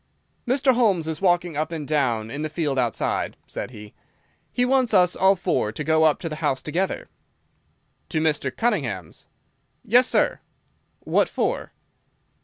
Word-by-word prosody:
"Mr. 265 +1 +3
Holmes 205 -10 +2
is 160 +1 -4
walking 175 -3 +2
up 155 +3 -2
and 155 -4 -5
down 120 -7 0
in 140 - -4
the 155 - -2
field 145 -4 -1
outside," 120 -4 -1
said - - -6
he. 105 -4 -12 0.6
"He 245 - +1
wants 255 -3 +2
us 180 -1 +4
all 190 +1 +4
four 175 - -1
to 115 - -5
go 160 +1 +3
up 155 - +3
to 170 - -3
the 155 -1 -5
house 145 -4 -1
together." 180 +5 -2 1.0
"To 160 - 0
Mr. 155 -3 +1
Cunningham's?" 130 - -2 0.6
"Yes, 250 +3 +5
sir." - - +1 0.6
"What - - +1
for?" - - -2
160 Hz, 155 wpm, -23 LUFS, 140-190 Hz, 1.0 s, Yes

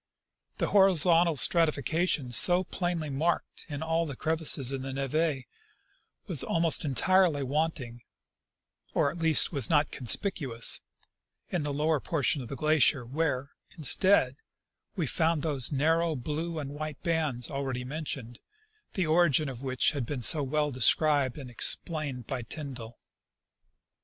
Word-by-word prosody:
The - - -1
horizontal 175 -4 +3
stratification 160 -2 +1
so 175 +9 +6
plainly 175 -4 -4
marked 160 +5 -3
in 145 0 -5
all 165 +1 -1
the 140 - -7
crevasses 155 -4 0
in 135 -1 -4
the 135 +1 -6
neve 135 +1 -2 0.8
was - - -1
almost 165 -1 +1
entirely 160 +1 +2
wanting, 135 -4 -3 0.9
or 140 - +2
at 170 - -10
least 160 -2 +4
was 140 -6 +2
not 150 -2 +2
conspicuous, 130 - +1 0.7
in 175 - -1
the 145 0 -2
lower 150 +2 0
portion 145 -2 -1
of 125 - -8
the - - -5
glacier, 150 -2 +2
where, 140 0 -3 0.3
instead, 155 -3 +2 0.6
we 175 -6 -2
found 160 +2 0
those 140 -6 -1
narrow 160 +3 +1
blue 155 +6 -5
and 140 -2 -5
white 150 0 -7
bands 155 -8 -2
already 135 -3 -4
mentioned, 135 -4 -6 0.6
the 185 - 0
origin 155 -3 +2
of 125 -2 -9
which 130 -2 +1
has 145 -3 -4
been 125 +1 -5
so 150 +7 +5
well 150 +2 -1
described 140 +1 +2
and 130 -4 -9
explained 140 -1 -1
by 130 0 -4
Tyndall. 120 -2 -8
150 Hz, 135 wpm, -28 LUFS, 135-165 Hz, 0.9 s, so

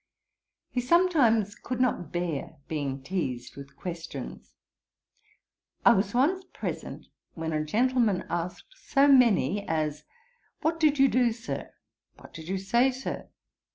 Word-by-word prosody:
He 250 - 0
sometimes 250 - +3
could 250 +3 -5
not 250 -8 0
bear 175 -5 -3
being 140 -3 -3
teazed 135 -8 -3
with 140 0 -11
questions. 165 - -7 1.3
I - - +9
was 195 +3 0
once 345 +10 +2
present - - -5 0.3
when 160 -1 -3
a 155 0 0
gentleman 225 +2 +1
asked 175 - -5
so 285 - +2
many 225 - +4
as, 150 -2 -1 0.6
'What 330 +1 0
did 300 -2 +3
you 275 0 +6
do, 245 -2 +3
Sir?' 230 +2 -5 0.5
'What - - -15
did 160 0 -9
you 190 +2 -1
say, 235 +7 +3
Sir?' 260 +1 -5
205 Hz, 130 wpm, -28 LUFS, 160-255 Hz, 1.3 s, I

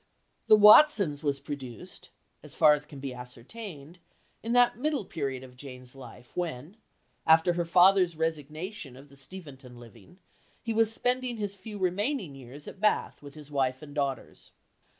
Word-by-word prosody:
The 215 - +8
Watsons 210 - +6
was 140 -2 -1
produced, 135 -5 -9 0.3
as - - -11
far 150 - +6
as 150 0 -4
can 145 -2 -11
be 135 -1 -5
ascertained, 140 - -10 0.4
in 230 - -4
that 245 0 +4
middle 290 -5 -1
period 135 -7 -4
of 125 -1 -14
Jane's 125 -1 -11
life 125 -2 -14
when, 165 - -5 0.5
after 160 +2 +5
her 170 0 -2
father's 180 0 +4
resignation 160 +1 -5
of 140 +2 -15
the 140 - -17
Steventon 135 -5 -11
living 120 - -16 0.5
he 230 - -2
was 225 0 +2
spending 250 +1 -1
his 205 -2 -4
few 205 +2 -10
remaining 195 - -2
years 135 +2 -12
at - - -10
Bath 215 - 0
with 145 0 -12
his 150 -1 -13
wife 130 -1 -1
and 145 -1 -11
daughters. 140 -4 -4
155 Hz, 160 wpm, -28 LUFS, 135-200 Hz, 0.5 s, The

